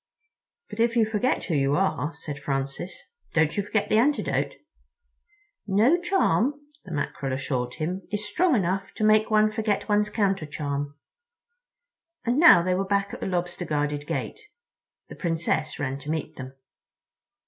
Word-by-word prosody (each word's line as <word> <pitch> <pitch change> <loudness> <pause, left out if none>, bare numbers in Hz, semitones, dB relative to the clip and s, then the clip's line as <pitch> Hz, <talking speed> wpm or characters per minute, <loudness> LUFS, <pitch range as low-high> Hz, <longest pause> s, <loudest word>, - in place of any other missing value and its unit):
"But - - -8
if 230 +1 +2
you 230 -2 +4
forget 220 +4 0
who 170 - -3
you 140 -1 +2
are," 175 -4 0
said 145 -2 -7
Francis, 140 +5 -4 0.3
"don't 160 -2 +3
you 205 - +1
forget 205 +1 -1
the 215 - +3
antidote?" 285 +5 +1 1.1
"No 230 - +3
charm," 345 - +2 0.3
the 185 - -10
Mackerel 140 -3 -3
assured 130 -2 -2
him, 175 +4 -3
"is 210 0 -2
strong 335 - +2
enough 190 -1 -1
to - - -3
make 215 0 +4
one 215 0 +4
forget 215 -2 -1
one's 210 0 +2
counter 195 -6 0
charm." 145 -1 -4 1.3
And 245 +4 +2
now 310 - +8
they 185 +1 +1
were 190 +2 0
back 200 0 0
at - - -6
the - - -3
Lobster 175 -1 -2
guarded 145 -2 -2
gate. - - -3 0.7
The - - -10
Princess 165 -3 -1
ran 135 -1 -3
to 145 - -9
meet 155 -1 -3
them. 130 0 -9
190 Hz, 160 wpm, -26 LUFS, 145-215 Hz, 1.3 s, now